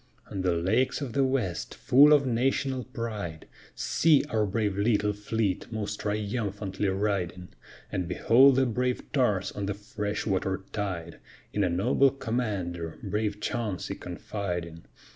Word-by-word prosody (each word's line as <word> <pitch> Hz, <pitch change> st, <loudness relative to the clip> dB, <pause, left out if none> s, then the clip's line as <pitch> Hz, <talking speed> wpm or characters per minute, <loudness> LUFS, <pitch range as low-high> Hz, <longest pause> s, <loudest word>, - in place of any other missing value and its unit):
On 95 Hz, -, -3 dB
the 90 Hz, -1 st, +2 dB
lakes 105 Hz, +10 st, +1 dB
of 135 Hz, -6 st, -5 dB
the 135 Hz, -, +3 dB
west, 130 Hz, -10 st, -1 dB
full 145 Hz, +4 st, +6 dB
of 145 Hz, -2 st, +6 dB
national 130 Hz, +1 st, 0 dB
pride, 105 Hz, -10 st, -5 dB, 0.3 s
See 155 Hz, -3 st, +3 dB
our 110 Hz, -2 st, +2 dB
brave 105 Hz, -1 st, 0 dB
little 105 Hz, 0 st, +2 dB
fleet 105 Hz, 0 st, -2 dB
most 105 Hz, -1 st, -3 dB
triumphantly 105 Hz, -1 st, -2 dB
riding! 95 Hz, -2 st, -1 dB, 0.4 s
And 90 Hz, -2 st, -2 dB
behold 130 Hz, +8 st, +5 dB
the 135 Hz, 0 st, +3 dB
brave 125 Hz, +1 st, -1 dB
tars 105 Hz, -9 st, +1 dB
on 100 Hz, -1 st, -4 dB
the 100 Hz, -, -2 dB
fresh 105 Hz, -1 st, -4 dB
water 95 Hz, -1 st, -1 dB
tide, 90 Hz, -5 st, -4 dB, 0.3 s
In 105 Hz, -, +1 dB
a 90 Hz, -, +2 dB
noble 95 Hz, +10 st, +3 dB
commander, 100 Hz, -, -3 dB
brave 105 Hz, +1 st, -1 dB
Chauncey, 110 Hz, -8 st, -2 dB
confiding. 90 Hz, -2 st, -5 dB
105 Hz, 140 wpm, -28 LUFS, 95-120 Hz, 0.4 s, full